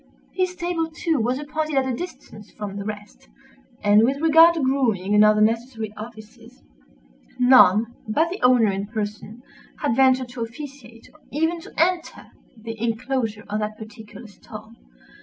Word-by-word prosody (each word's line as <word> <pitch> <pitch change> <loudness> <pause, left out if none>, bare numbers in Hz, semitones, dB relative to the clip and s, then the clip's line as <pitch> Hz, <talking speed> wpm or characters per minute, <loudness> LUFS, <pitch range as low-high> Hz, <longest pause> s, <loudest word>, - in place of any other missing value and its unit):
His 370 -1 -1
stable, 345 -2 -2
too, 325 -2 -1
was 245 +3 0
appointed 305 +1 -3
at 270 -1 +2
a 260 - -2
distance 220 - -9
from 205 -2 -7
the 200 - -5
rest; 205 - -9 0.5
and 205 +1 +5
with 270 +4 +1
regard 325 +2 +6
to - - -2
grooming 230 -8 0
and 210 0 +6
other 215 0 +4
necessary 225 0 -1
offices, 215 - -12 0.7
none 235 -3 +5
but 315 +10 +1
the 380 - -6
owner 245 -4 +4
in 195 +1 -4
person 215 +2 -6 0.3
had 225 - -1
ventured 260 -1 +3
to 245 -1 -8
officiate, 230 -1 -9
or 310 - -22
even 325 +3 -1
to 385 - -13
enter 340 +1 -1 0.3
the 225 0 -8
enclosure 230 -1 -2
of 210 +1 -3
that 215 0 -4
particular 220 +2 -12
stall. 200 -3 -12
235 Hz, 160 wpm, -23 LUFS, 215-290 Hz, 0.7 s, regard